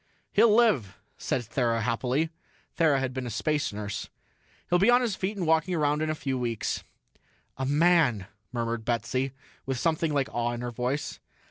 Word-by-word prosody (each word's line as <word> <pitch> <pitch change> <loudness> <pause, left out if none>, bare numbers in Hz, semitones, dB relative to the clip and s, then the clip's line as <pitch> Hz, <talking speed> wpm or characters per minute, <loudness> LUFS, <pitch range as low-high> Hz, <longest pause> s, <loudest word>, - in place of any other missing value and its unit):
"He'll 230 - +6
live," 210 - +3 0.2
said 130 - -1
Thera 115 -1 0
happily. 130 +7 0 0.4
Thera 155 -4 +4
had 130 -1 -2
been 130 -1 -4
a - - -3
space 145 +7 0
nurse. 105 -1 -5 0.6
"He'll 175 - +3
be 200 +5 +4
on 245 +1 +6
his 230 -6 0
feet 200 +3 -3
and 180 - -1
walking 160 +3 +2
around 150 -1 +1
in 155 - 0
a 155 - 0
few 135 -3 -2
weeks." 115 -3 -2 0.7
"A 130 0 -2
man!" 145 - +3 0.3
murmured 115 -2 -2
Betsy, 120 +3 -1 0.4
with 135 -1 -1
something 160 +3 +1
like 140 -2 +1
awe 120 0 0
in 120 - -5
her 120 0 -3
voice. 125 +5 -2
135 Hz, 175 wpm, -27 LUFS, 120-160 Hz, 0.7 s, He'll